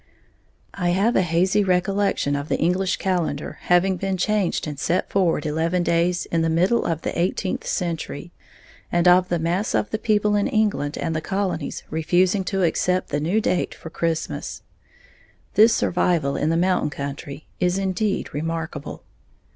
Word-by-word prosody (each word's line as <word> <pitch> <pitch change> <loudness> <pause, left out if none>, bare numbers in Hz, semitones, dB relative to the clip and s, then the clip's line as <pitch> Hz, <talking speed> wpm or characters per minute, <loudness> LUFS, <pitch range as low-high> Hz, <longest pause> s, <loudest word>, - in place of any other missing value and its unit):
I 180 -3 -1
have 220 +5 +2
a - - +4
hazy 185 +4 +2
recollection 195 -4 +1
of 140 +1 -4
the - - +1
English 180 +3 +1
calendar 175 -6 -2
having 180 +1 +3
been 195 +1 -2
changed 205 0 0
and 150 -2 -6
set 175 +6 0
forward 175 -6 +1
eleven 165 +4 0
days 175 +1 +1
in 165 - +2
the 165 - +1
middle 180 +8 +2
of 165 -1 -2
the - - -3
eighteenth 185 +2 -1
century, 170 -1 -3 0.6
and 175 +1 +2
of 180 +1 +5
the 175 - +1
mass 170 +6 -1
of - - 0
the 220 - -1
people 210 -1 +2
in 205 - +2
England 205 -9 0
and 165 -1 -2
the 155 - -1
colonies 190 -5 -3
refusing 180 +5 +2
to 195 -1 0
accept 180 +2 +1
the 145 - -1
new 170 +8 +1
date 185 -4 -1
for 160 - -10
Christmas. 165 -1 -3 0.9
This 225 +2 +6
survival 170 -5 +1
in 150 - 0
the 165 - +2
mountain 180 -3 +1
country 140 +1 -6
is 180 +1 +1
indeed 195 +2 -1
remarkable. 160 -1 -4
175 Hz, 165 wpm, -23 LUFS, 160-195 Hz, 0.9 s, This